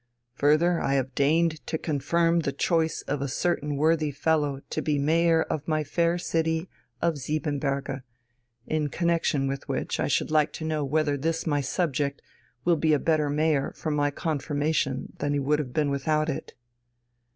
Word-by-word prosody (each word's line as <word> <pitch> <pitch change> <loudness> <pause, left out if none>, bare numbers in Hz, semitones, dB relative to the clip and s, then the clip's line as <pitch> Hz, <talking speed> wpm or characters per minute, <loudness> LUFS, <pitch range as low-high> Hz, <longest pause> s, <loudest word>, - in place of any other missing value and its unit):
Further, 155 +6 +3
I 135 - +1
have 130 -1 -1
deigned 155 +3 +2
to 160 - -1
confirm 165 +3 +1
the 145 -4 -1
choice 160 +2 0
of 145 -2 -3
a 140 - -1
certain 150 +1 -1
worthy 155 +1 +2
fellow 145 -1 0
to - - -1
be 150 -2 0
mayor 165 +3 +3
of 150 - -4
my 155 -1 +1
fair 170 +4 +1
city 160 0 -1 0.4
of 165 -4 +1
Siebenberge 140 -1 -2 0.6
in 155 -2 -1
connection 165 -3 +1
with 135 0 -4
which - - -2
I - - +1
should - - 0
like 155 -1 +3
to 160 - -5
know 155 -2 -1
whether 145 0 +1
this 165 +4 -1
my 145 -2 +1
subject 140 -1 -1 0.4
will 170 -1 +4
be 155 0 +2
a - - +5
better 155 -2 +1
mayor 150 -1 +1
for 155 - -3
my 145 -1 +2
confirmation 145 -2 -1
than 145 0 0
he 145 - +1
would 145 +2 +1
have 135 -5 -4
been 145 +1 +1
without 155 +3 0
it...." 140 - -5
150 Hz, 175 wpm, -26 LUFS, 140-160 Hz, 0.6 s, a